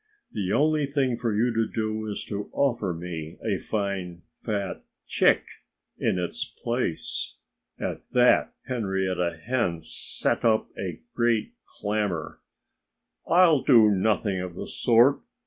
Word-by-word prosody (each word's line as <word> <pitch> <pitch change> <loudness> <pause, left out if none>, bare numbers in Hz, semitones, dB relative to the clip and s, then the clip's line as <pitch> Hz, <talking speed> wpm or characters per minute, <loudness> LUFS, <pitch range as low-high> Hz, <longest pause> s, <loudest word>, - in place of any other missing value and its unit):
"The 100 -3 -2
only 150 -1 +2
thing 135 -3 +1
for 115 -1 -1
you 115 +3 +1
to 115 -1 +1
do 110 0 -2
is 105 - -4
to 100 -1 -5
offer 120 -9 +1
me 85 -2 -6
a - - 0
fine, 95 -5 -3 0.2
fat 100 -4 -3 0.2
chick - - +3 0.6
in - - +1
its 90 -1 -2
place." 120 -8 -3 0.4
At - - -3
that 125 -1 +4
Henrietta 95 -7 -1
Hen 115 -10 0
set - - -2
up 110 -1 +3
a 90 -4 -5
great 120 - +1 0.3
clamor. 105 -6 -2 0.9
"I'll 170 -5 +5
do 115 -6 +6
nothing 100 0 +1
of 90 -2 -6
the - - -5
sort!" 120 +3 +4
110 Hz, 130 wpm, -26 LUFS, 95-120 Hz, 0.9 s, do